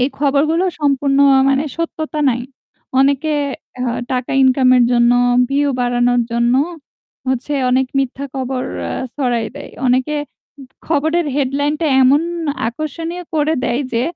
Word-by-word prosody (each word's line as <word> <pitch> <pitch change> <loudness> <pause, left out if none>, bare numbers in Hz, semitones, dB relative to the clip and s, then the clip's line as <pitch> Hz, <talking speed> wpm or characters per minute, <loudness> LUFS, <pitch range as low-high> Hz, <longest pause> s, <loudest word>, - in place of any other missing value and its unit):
এই 255 - +2
খবরগুলো 295 +5 +2 0.2
সম্পূর্ণ 280 -1 +1
অ্যাঁ 265 -1 +5
মানে 275 +2 +1
সত্যতা 315 -2 -3
নাই। 245 0 -2 0.6
অনেকে 280 +3 +2 0.4
অ্যাঁ 245 -1 -2
টাকা 250 -1 -2
ইনকামের 255 -1 +4
জন্য, 240 0 +4 0.4
ভিউ 285 +1 +1
বাড়ানোর 245 0 +2
জন্য 235 +1 +2 0.7
হচ্ছে 260 +3 -1 0.2
অনেক 260 +1 +2
মিথ্যা 270 +1 -2
কবর 260 -1 -3 0.2
এ্যা 85 - -3 0.2
ছড়াই 245 -5 0
দেয়। 285 - -9 0.2
অনেকে 255 +4 +1 0.4
উ - - -9 0.2
খবরের 320 +2 +1
হেডলাইন 285 +1 0
টা 325 - +1 0.2
এমন 275 +4 +4 0.5
আকর্ষণীয় 325 +7 -5
করে 310 +1 +1
দেয় 240 +2 0
যে 230 0 +1
270 Hz, 135 wpm, -17 LUFS, 250-295 Hz, 0.7 s, অ্যাঁ